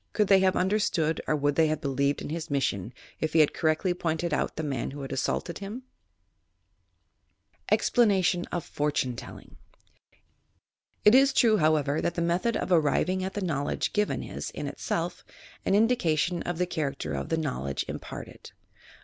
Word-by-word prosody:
Could 210 -2 +1
they 195 -1 +7
have 190 0 +3
under 190 +4 +2
stood 160 -6 0
or 155 - +2
would 145 0 +1
they 160 +2 +3
have 155 -1 -1
believed 140 -1 0
in - - -6
his 165 0 -4
mission 120 -7 -1 0.3
if 155 - -2
he 165 - +4
had 150 - +3
correctly 160 +3 +1
pointed 165 -1 -2
out - - -1
the 160 - -3
man 135 -5 -2
who 140 +1 -7
had 135 - -6
assaulted 170 +5 -2
himT 210 +6 -7 1.9
EXPLANATION 190 -7 +3
OP 175 -2 -2
"POKTUNE 145 -4 -1
TELLINO" - - -11 1.5
It 210 - +8
is 270 +1 +6
true, 225 -5 +4
however, 155 -3 +2
that 170 - -1
the 170 - -1
method 175 +7 +1
of - - -3
arriving 180 +3 +2
at 190 +2 -4
the 205 - -2
knowledge 145 -4 -1
given 210 0 0
is, - - -6
in - - -6
itself, - - -3 0.4
an 195 - +3
indication 180 -7 +2
of 175 -1 -3
the 180 - +1
char 155 -5 -2
acter - - -5
of - - -4
the 160 - +1
knowledge 95 - -2
imparted. - - -8
165 Hz, 175 wpm, -27 LUFS, 145-190 Hz, 1.9 s, It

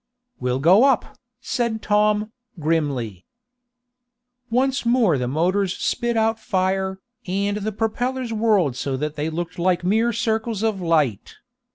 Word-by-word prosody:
"We'll 125 0 0
go 180 - +5
up," 270 -3 +1 0.3
said 235 -3 -2
Tom, 210 +1 +2 0.3
grimly. 140 - -1 1.3
Once 265 +3 +1
more 235 - +3
the 125 - -1
motors 180 +7 0
spit 240 -1 -1
out 225 0 +1
fire, 190 -2 -1 0.3
and 200 +2 -1
the 210 +1 -3
propellers 235 +3 -2
whirled 210 - +2
so 135 0 -2
that 150 +2 -3
they 150 +1 -2
looked 175 +2 -5
like 180 0 +1
mere 220 +6 +2
circles 220 -1 -1
of 215 -4 0
light. 150 - 0
200 Hz, 135 wpm, -22 LUFS, 165-225 Hz, 1.3 s, go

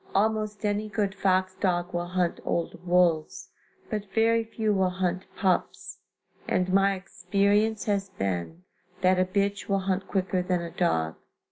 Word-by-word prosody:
Almost 215 +1 0
any 210 +1 0
good 205 -2 -1
fox 185 -1 +1
dog 175 -2 -1
will 175 0 -2
hunt 180 -1 0
old 170 +1 -3
wolves, 175 -3 +2 0.4
but 210 -3 -4
very 230 0 +3
few 220 -1 -1
will 190 -2 +2
hunt 185 0 -2
pups, 185 -2 -1 0.5
and 185 0 0
my 195 0 +4
experience 200 +4 0
has 200 -2 0
been 95 - -3 0.4
that 185 0 +4
a 185 - +4
bitch 200 +2 -1
will 195 -1 +2
hunt 190 0 -1
quicker 190 -1 0
than 180 0 0
a 170 - -6
dog. 80 -1 0
190 Hz, 150 wpm, -27 LUFS, 180-205 Hz, 0.5 s, my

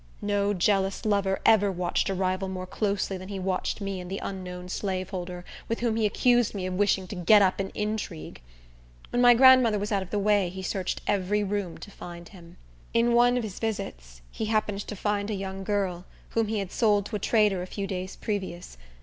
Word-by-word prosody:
No 205 0 +1
jealous 195 +2 +1
lover 200 -2 +1
ever 205 -3 +5
watched 180 +1 -1
a 195 - -1
rival 185 +1 -1
more 185 -1 -5
closely 200 0 -2
than 185 - -9
he 200 - -4
watched 185 +2 -2
me 195 -1 -3
and 180 - -8
the 195 - -3
unknown 180 -2 -6
slaveholder, 185 -2 -4 0.2
with 230 - -2
whom 235 -2 +1
he 220 -1 +2
accused 240 +1 +2
me 190 -2 -3
of 185 - -3
wishing 195 0 +2
to - - -5
get 200 +4 +6
up 185 0 +1
an 195 0 -2
intrigue. 210 - -4 0.7
When 245 - +1
my 245 -1 +8
grandmother 255 -3 +7
was 205 +1 -3
out 200 -2 +1
of 190 - -7
the 210 - -1
way 205 -2 +2
he 190 +1 -7
searched 185 0 -2
every 205 +1 +1
room 200 -4 -3
to 205 - -11
find 175 -2 -10
him. 175 -3 -15 0.4
In 235 +1 +3
one 245 +1 +5
of 245 - -1
his 205 -4 -6
visits, - - -5
he 220 - -3
happened 215 -2 0
to 210 - -5
find 205 +1 -1
a 215 - -1
young 195 0 -5
girl, 190 -3 -1 0.2
whom 225 -1 0
he 220 +1 -1
had 195 -3 -3
sold 210 -4 +2
to 215 - -5
a - - -9
trader 210 -3 +2
a 180 - -5
few 200 +1 -4
days 185 -1 -4
previous. 185 - -5
195 Hz, 210 wpm, -27 LUFS, 185-210 Hz, 0.7 s, my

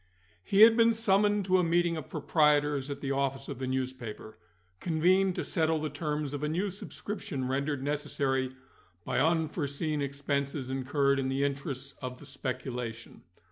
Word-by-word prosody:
He 200 - +3
had 225 +1 +9
been 230 0 +5
summoned 205 -2 +2
to 185 0 +3
a - - +3
meeting 170 0 +2
of 155 -5 -6
proprietors 150 -2 +2
at 140 -1 -5
the 140 - -2
office 135 0 -1
of 140 -3 -6
the 130 - -3
newspaper, 130 -4 -4 0.4
convened 180 +3 +2
to - - -2
settle 160 -1 +1
the 155 -1 -3
terms 150 -1 -3
of 145 - -4
a 150 - -1
new 185 +5 -1
subscription 195 -7 -5
rendered 140 +1 -1
necessary 140 -3 -1 0.5
by - - 0
unforeseen 155 -2 0
expenses 140 -1 -2
incurred 140 +1 +1
in 130 -1 -1
the 135 +1 0
interests 140 -1 -3
of 125 -1 -5
the 145 - -13
speculation. 125 -4 -5
145 Hz, 160 wpm, -30 LUFS, 135-165 Hz, 0.5 s, had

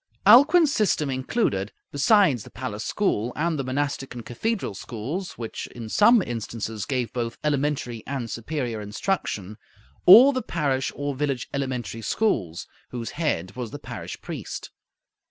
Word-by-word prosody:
Alcuin's 300 +4 +7
system 165 - +1
included, 130 - -1 0.2
besides 145 - +4
the - - -12
palace 115 -5 -5
school, 120 - 0
and 160 +1 0
the - - 0
monastic 135 0 -2
and 120 -2 -7
cathedral 220 - -2
schools, 130 - -5
which 115 -2 -6
in 115 -2 -6
some 215 - +5
instances 110 - -4
gave 125 -5 -2
both 120 -1 -3
elementary 140 -5 -1
and 130 -4 -3
superior 120 -3 -3
instruction, 105 - -3 0.5
all 245 +9 +10
the 255 - -1
parish 140 - -1
or 145 0 -2
village 135 -2 -2
elementary 130 -4 -3
schools, 95 - -1 0.2
whose 120 -2 -5
head 130 - -2
was 125 -3 -4
the 145 - -7
parish 120 -5 -7
priest. - - -6
130 Hz, 140 wpm, -25 LUFS, 115-160 Hz, 0.5 s, all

